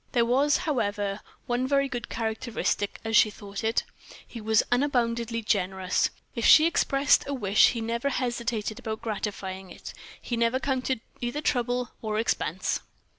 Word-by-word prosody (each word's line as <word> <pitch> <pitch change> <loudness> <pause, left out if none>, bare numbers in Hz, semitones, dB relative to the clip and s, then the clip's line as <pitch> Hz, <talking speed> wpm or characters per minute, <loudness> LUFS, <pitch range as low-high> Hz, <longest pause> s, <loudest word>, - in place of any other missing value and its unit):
There 235 -2 +3
was, 275 +5 +3
however, 205 -8 -1 0.2
one 245 0 0
very 275 0 +2
good 245 -4 -5
characteristic, 220 -2 -2
as 225 0 0
she 215 - +6
thought 200 -1 -8
it 225 +1 +1 0.4
he 230 - -9
was 220 0 +3
unboundedly 235 -3 0
generous; 190 -2 +1 0.2
if 235 - -4
she 315 +5 +8
expressed 285 -4 +3
a 280 - -2
wish 205 -5 +4
he 230 - -3
never 235 +4 -1
hesitated 235 -4 -2
about 220 -1 -5
gratifying 195 -3 -4
it; - - -10 0.3
he 240 - -3
never 235 +2 +1
counted 260 -3 -1 0.2
either 240 +4 -2
trouble 245 -3 0
or 215 -1 -2
expense. 225 - -1
230 Hz, 150 wpm, -27 LUFS, 215-255 Hz, 0.4 s, she